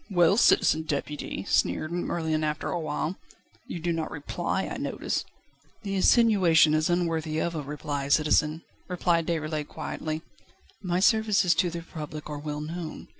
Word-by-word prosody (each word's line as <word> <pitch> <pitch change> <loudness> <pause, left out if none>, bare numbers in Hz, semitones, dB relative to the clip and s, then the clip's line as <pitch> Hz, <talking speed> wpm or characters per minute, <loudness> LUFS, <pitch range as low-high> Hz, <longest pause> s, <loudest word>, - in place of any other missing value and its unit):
"Well, 175 -1 +4
Citizen 160 -7 +4
Deputy," 150 -8 -4
sneered 90 - +1
Merlin 160 -3 -1
after 150 0 -2
a - - -1
while, 155 +3 -3 0.5
"you 175 - -5
do 170 +1 -1
not 160 -1 -2
reply, 145 - -2
I - - -5
notice." - - -2 0.6
"The 200 -1 -3
insinuation 190 -7 +5
is 155 +1 +2
unworthy 165 -3 0
of 170 +2 -1
a 155 - -3
reply, 145 -1 -4
citizen," 155 +2 +2 0.2
replied 175 -2 +1
Déroulède 155 -2 -2
quietly; 155 0 -5 0.6
"my 180 -2 0
services 210 -3 +4
to 175 +2 +1
the 170 0 -5
Republic 155 -2 -7
are 145 - -4
well 150 0 -4
known. 160 +1 -6
160 Hz, 150 wpm, -27 LUFS, 150-175 Hz, 0.6 s, insinuation